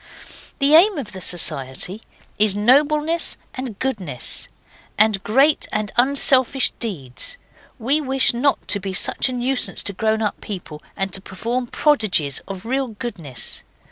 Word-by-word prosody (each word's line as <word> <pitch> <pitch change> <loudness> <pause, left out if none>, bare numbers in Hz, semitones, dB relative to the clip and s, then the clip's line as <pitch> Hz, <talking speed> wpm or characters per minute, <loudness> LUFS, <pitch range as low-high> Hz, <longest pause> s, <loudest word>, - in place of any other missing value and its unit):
'The 280 +1 +3
aim 370 +5 +6
of 240 -7 -6
the 190 - -9
society 160 +3 +1 0.4
is 210 -2 +4
nobleness 300 +9 +2 0.2
and 255 -5 -6
goodness, 195 - -2 0.5
and 215 -2 +3
great 275 +7 +2
and 215 -1 -2
unselfish 265 0 +3
deeds. 145 - -2 0.4
We 275 +6 0
wish 265 -3 +3
not 270 +4 0
to 205 - +3
be 195 0 -5
such 185 - +2
a - - -4
nuisance 250 +1 0
to 200 - -2
grown 220 +2 0
up 210 - -3
people 170 -7 -8 0.2
and 195 -1 -2
to 190 - -2
perform 235 +6 -4
prodigies 215 - +1
of 195 +1 -8
real 265 +3 -1
goodness. 205 - -5
225 Hz, 140 wpm, -20 LUFS, 195-265 Hz, 0.5 s, aim